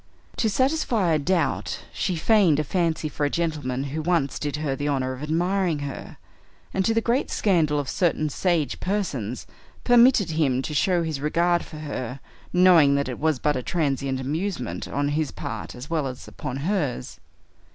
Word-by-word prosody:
To 220 - +2
satisfy 245 - +1
a 155 - +2
doubt, 170 +1 0
she 185 - -1
feigned 175 -3 +4
a - - +1
fancy 165 0 0
for 150 0 -4
a 145 - +2
gentleman 145 -6 -2
who 155 - -2
once 160 -4 0
did 145 -1 -2
her 150 -3 -2
the 145 +2 -3
honor 130 -2 0
of 130 - -9
admiring 175 +2 0
her, 140 - -7 0.6
and, 190 - +1
to 225 - +2
the 230 - +3
great 245 +4 +1
scandal 165 -7 +2
of 145 -2 -2
certain 155 +1 +1
sage 165 0 0
persons, 150 - -2 0.4
permitted 240 -6 +5
him 135 -5 +1
to 150 - -4
show 175 +3 +2
his 155 -4 -3
regard 170 +3 +2
for 155 - -10
her, 140 -4 -5 0.3
knowing 175 -6 +6
that 140 -1 0
it 125 - -5
was 155 -2 +1
but 150 +3 0
a 130 - -1
transient 135 -3 -1
amusement 140 - -3
on 145 0 -1
his 150 0 0
part 120 -8 -6
as 125 +3 -8
well 155 -3 -1
as 130 -1 -8
upon 125 - -6
hers. 145 - -2
155 Hz, 180 wpm, -24 LUFS, 140-180 Hz, 0.6 s, knowing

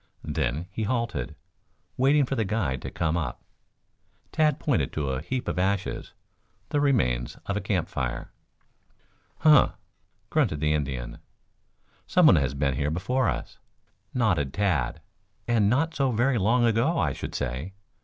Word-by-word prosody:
Then 65 +8 -1
he - - -4
halted, 110 - -2 0.6
waiting 140 +2 +4
for 130 - -3
the 115 -4 +1
guide 95 - -1
to - - -5
come 80 -1 -1
up. 85 -3 -3 0.9
Tad 155 -2 +2
pointed 140 -7 0
to 70 -3 -1
a 65 +1 -2
heap 125 +10 -3
of 85 0 -1
ashes, 95 0 -1 0.6
the 145 - +1
remains 60 - +1
of - - -2
a - - -1
campfire. 60 -2 -2 1.1
"Huh!" 150 -3 +6 0.6
grunted 75 - +1
the 75 0 +2
Indian. 65 -5 -3 0.9
"Someone 165 - +6
has 70 -1 0
been 70 -1 +1
here 70 +3 -1
before 110 +11 0
us," - - -5 0.5
nodded 90 - +1
Tad. 100 -7 0 0.5
"And 110 -4 +3
not 150 +7 +1
so 135 -3 +1
very 120 +2 +2
long 120 +5 +3
ago, 120 +9 +2
I - - +1
should - - -6
say. 65 +10 -3
100 Hz, 145 wpm, -26 LUFS, -, 1.1 s, Huh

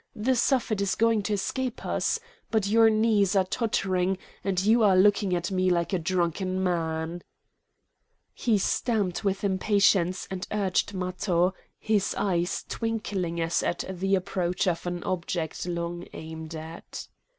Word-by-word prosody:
The 250 +5 +1
Suffet 235 -4 +1
is 200 -1 +1
going 230 -1 +3
to 210 +1 -2
escape 250 +5 -2
us! 455 - 0 0.3
But 220 -3 +1
your 225 +2 +5
knees 215 -3 +3
are 190 - +5
tottering, 190 -3 0 0.3
and 190 -2 0
you 225 +2 +5
are 195 -3 +5
looking 200 -1 +4
at 175 +3 -2
me 185 0 +2
like 175 +2 0
a 185 - +2
drunken 185 +2 -1
man!" 165 -1 -1 1.1
He 225 -4 +1
stamped 200 -2 0
with 195 0 -1
impatience 195 -2 +2
and 190 -1 -4
urged 200 -1 0
Matho, 180 0 0 0.2
his 210 -2 0
eyes 175 -2 -1
twinkling 205 -7 -2
as 165 0 +1
at 175 - -2
the 190 +1 0
approach 185 0 -1
of 175 0 -1
an 175 0 -3
object 175 -2 -3
long 170 0 -4
aimed 160 0 -7
at. 160 +1 -8
190 Hz, 145 wpm, -27 LUFS, 175-210 Hz, 1.1 s, your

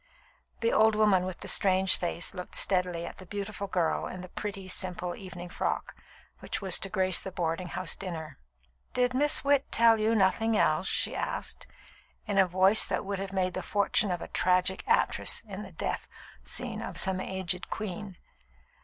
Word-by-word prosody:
The 230 - +2
old 220 0 +5
woman 205 -4 +4
with 185 -1 -6
the - - -5
strange 190 -1 +3
face 175 -1 -1
looked 180 - -7
steadily 180 -3 +1
at - - -8
the 185 - -10
beautiful 200 +1 -5
girl 175 -4 0
in 185 - -7
the 185 - -9
pretty, 195 -1 -5
simple, 180 -1 -3
evening 180 -2 -9
frock - - -2 0.4
which - - -4
was 190 -3 +2
to 195 - -3
grace 185 -2 +2
the 190 - -6
boarding 170 0 -2
house 180 -2 -2
dinner. 165 - -6 0.6
"Did 250 0 +2
Miss 290 +3 +2
Witt 280 -1 +2
tell 230 -1 +5
you 220 +1 +2
nothing 220 +2 +2
else?" 165 +3 +2
she - - 0
asked, - - -4 0.6
in 200 -1 +1
a 190 - +6
voice 190 +4 +6
which - - +1
would 200 -1 -4
have 195 0 -4
made 185 -2 0
the - - -3
fortune 205 0 +1
of 175 -2 -2
a - - -7
tragic 185 +1 +1
actress 465 - +2
in 200 0 -6
the 195 -2 -9
death 160 - -3 0.4
scene - - -4
of - - -6
some 190 -1 +1
aged 185 -1 -3
queen. 200 -2 -5
190 Hz, 180 wpm, -29 LUFS, 180-210 Hz, 0.6 s, a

